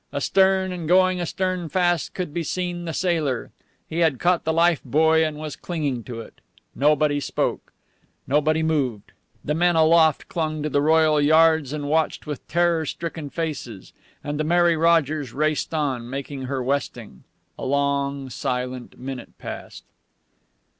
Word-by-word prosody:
Astern, 190 Hz, -1 st, +2 dB
and 175 Hz, -3 st, -5 dB
going 185 Hz, +1 st, +4 dB
astern 180 Hz, 0 st, -2 dB
fast, 175 Hz, -1 st, 0 dB
could 180 Hz, -5 st, -4 dB
be 170 Hz, -, -1 dB
seen 175 Hz, +2 st, -3 dB
the 165 Hz, -, -3 dB
sailor. 160 Hz, -8 st, -1 dB, 0.4 s
He 165 Hz, -, -4 dB
had 160 Hz, -6 st, +3 dB
caught 175 Hz, +3 st, +1 dB
the 160 Hz, -, +1 dB
life 170 Hz, 0 st, +3 dB
buoy 160 Hz, +4 st, +3 dB
and 155 Hz, -1 st, -2 dB
was 155 Hz, -1 st, -6 dB
clinging 145 Hz, -9 st, -3 dB
to 115 Hz, -2 st, -6 dB
it. 110 Hz, -, -15 dB, 0.3 s
Nobody 150 Hz, 0 st, +2 dB
spoke. 140 Hz, -, -2 dB, 0.5 s
Nobody 155 Hz, +3 st, +2 dB
moved. 135 Hz, -10 st, -1 dB, 0.3 s
The 150 Hz, -, 0 dB
men 175 Hz, +2 st, +2 dB
aloft 160 Hz, -1 st, +4 dB
clung 155 Hz, -2 st, -2 dB
to 150 Hz, -, -1 dB
the 145 Hz, 0 st, +1 dB
royal 155 Hz, 0 st, +4 dB
yards 160 Hz, -1 st, +4 dB
and 145 Hz, -1 st, -4 dB
watched 160 Hz, +2 st, 0 dB
with 150 Hz, -3 st, -6 dB
terror 170 Hz, -1 st, +2 dB
stricken 165 Hz, -2 st, -5 dB
faces. 145 Hz, -, -5 dB, 0.3 s
And 145 Hz, 0 st, -4 dB
the -, -, +1 dB
Mary 170 Hz, +1 st, +3 dB
Rogers 155 Hz, -5 st, +2 dB
raced 155 Hz, +1 st, 0 dB
on, 135 Hz, -7 st, -2 dB
making 135 Hz, 0 st, -5 dB
her 130 Hz, 0 st, -2 dB
westing. 125 Hz, -, -3 dB, 0.4 s
A -, -, -6 dB
long, 140 Hz, -1 st, -1 dB
silent 125 Hz, 0 st, -4 dB
minute 130 Hz, 0 st, -8 dB
passed. -, -, -8 dB
155 Hz, 155 wpm, -23 LUFS, 140-170 Hz, 0.5 s, going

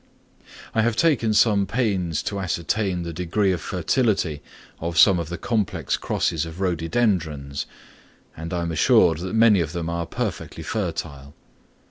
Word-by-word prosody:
I 110 Hz, -, +2 dB
have 115 Hz, 0 st, +1 dB
taken 130 Hz, -7 st, +2 dB
some 105 Hz, -2 st, +3 dB
pains 95 Hz, -, -1 dB
to 100 Hz, -, -3 dB
ascertain 95 Hz, +1 st, -1 dB
the 85 Hz, 0 st, -5 dB
degree 90 Hz, +4 st, 0 dB
of 90 Hz, -3 st, -2 dB
fertility 90 Hz, -, 0 dB, 0.4 s
of 85 Hz, +1 st, -4 dB
some 95 Hz, 0 st, +6 dB
of 85 Hz, -2 st, -4 dB
the 85 Hz, -, -4 dB
complex 105 Hz, -, -1 dB
crosses 80 Hz, -2 st, -1 dB
of 80 Hz, +1 st, -8 dB
Rhododendrons, 85 Hz, -6 st, -1 dB, 0.7 s
and 80 Hz, +2 st, -7 dB
I 85 Hz, -2 st, -1 dB
am 85 Hz, -, -2 dB
assured 80 Hz, 0 st, +4 dB
that 95 Hz, +4 st, -4 dB
many 110 Hz, -3 st, +5 dB
of 80 Hz, -1 st, -3 dB
them 85 Hz, -1 st, -3 dB
are 85 Hz, 0 st, -3 dB
perfectly -, -, -4 dB
fertile. 70 Hz, 0 st, -4 dB
90 Hz, 150 wpm, -23 LUFS, 80-105 Hz, 0.7 s, some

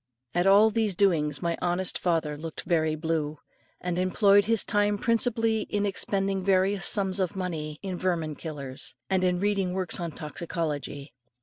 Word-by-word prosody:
At 175 Hz, +2 st, +2 dB
all 205 Hz, +3 st, +6 dB
these 215 Hz, -3 st, +1 dB
doings 165 Hz, -6 st, +1 dB
my 170 Hz, -1 st, 0 dB
honest 180 Hz, +1 st, 0 dB
father 165 Hz, -4 st, 0 dB
looked 160 Hz, +2 st, -7 dB
very 160 Hz, -2 st, +1 dB
blue, 155 Hz, -1 st, -2 dB, 0.4 s
and 180 Hz, 0 st, -2 dB
employed 200 Hz, +2 st, +4 dB
his 225 Hz, 0 st, +2 dB
time 205 Hz, -1 st, +1 dB
principally 225 Hz, 0 st, +1 dB
in 205 Hz, 0 st, 0 dB
expending 195 Hz, 0 st, -1 dB
various 195 Hz, 0 st, +2 dB
sums 195 Hz, -1 st, +1 dB
of 185 Hz, -1 st, -1 dB
money 160 Hz, -5 st, -4 dB
in 185 Hz, -3 st, -4 dB
vermin 165 Hz, -4 st, -1 dB
killers, 140 Hz, -4 st, -4 dB, 0.2 s
and 190 Hz, -1 st, +2 dB
in 180 Hz, -1 st, +2 dB
reading 195 Hz, -2 st, 0 dB
works 185 Hz, -1 st, -2 dB
on 170 Hz, -1 st, -3 dB
toxicology. 150 Hz, -3 st, -5 dB
180 Hz, 160 wpm, -27 LUFS, 160-200 Hz, 0.4 s, all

